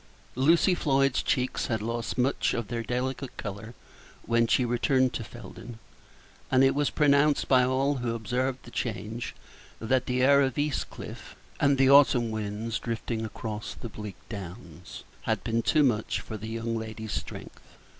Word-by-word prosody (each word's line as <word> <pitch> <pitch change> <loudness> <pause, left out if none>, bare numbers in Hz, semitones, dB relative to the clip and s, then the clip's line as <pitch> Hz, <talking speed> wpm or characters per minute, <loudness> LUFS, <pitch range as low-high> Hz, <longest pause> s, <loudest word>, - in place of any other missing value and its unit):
Lucy 165 +8 +4
Floyd's 135 -5 +2
cheeks 130 -1 0
had 115 -2 0
lost 115 +2 -3
much 130 +2 +1
of 120 -3 -3
their 120 -1 -2
delicate 125 +3 -3
color 105 +3 -6 0.5
when 115 0 +2
she 125 - +3
returned 130 +2 +2
to 115 - -3
Felden 120 +2 -10 0.7
and 130 0 +4
it 135 - +5
was 145 0 +1
pronounced 145 0 +3
by 130 -2 +5
all 135 +2 +1
who 120 -2 -2
observed 125 +4 -1
the 120 - -12
change 110 +1 -4 0.4
that 125 +3 0
the 125 0 +1
air 140 +1 +6
of 130 -3 0
East 145 -1 -1
Cliff, - - -9 0.2
and 140 -1 +3
the 135 0 +5
autumn 130 -5 +6
winds 110 +1 -3
drifting 115 -1 -3
across 110 -1 -5
the 120 - -7
bleak 105 -1 -8
downs, 95 -5 -9 0.2
had - - 0
been 115 0 0
too 150 +5 +3
much 115 -5 +1
for 110 - -7
the 110 +1 -6
young 115 0 -3
lady's 110 -2 -5
strength. - - -6
120 Hz, 165 wpm, -28 LUFS, 110-135 Hz, 0.7 s, air